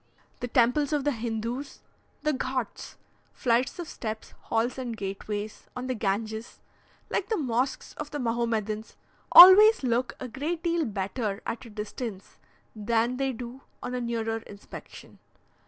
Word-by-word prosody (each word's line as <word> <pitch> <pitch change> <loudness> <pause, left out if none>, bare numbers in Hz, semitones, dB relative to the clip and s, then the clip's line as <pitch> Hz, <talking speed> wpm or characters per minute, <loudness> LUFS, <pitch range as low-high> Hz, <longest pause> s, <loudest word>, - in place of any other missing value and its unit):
The 245 - -3
temples 250 +5 +2
of 290 -2 +1
the 290 - +2
Hindoos, 235 +3 -4 0.4
the 305 0 +2
Ghauts 260 -2 -3 0.4
(flights 245 +3 +1
of 345 -2 -5
steps, 220 -5 -6
halls, 235 +3 0
and 240 -3 -4
gateways) 205 +1 -5
on 250 0 -4
the 255 - -1
Ganges, 220 +1 -3 0.5
like 395 - -1
the 440 - +1
mosques 255 -2 -1
of 300 -1 -5
the 295 - -4
Mahomedans, 230 -3 -1 0.4
always 390 +2 +10
look 240 -1 +1
a 255 - -5
great 310 +7 -3
deal 340 -2 +1
better 200 0 -3
at 230 +2 -4
a - - -10
distance 210 -1 -6 0.4
than 230 +3 0
they 270 0 0
do 245 +2 -8 0.2
on 250 - -4
a 250 - -2
nearer 225 -1 -1
inspection. 205 -2 -12
235 Hz, 145 wpm, -27 LUFS, 220-265 Hz, 0.5 s, always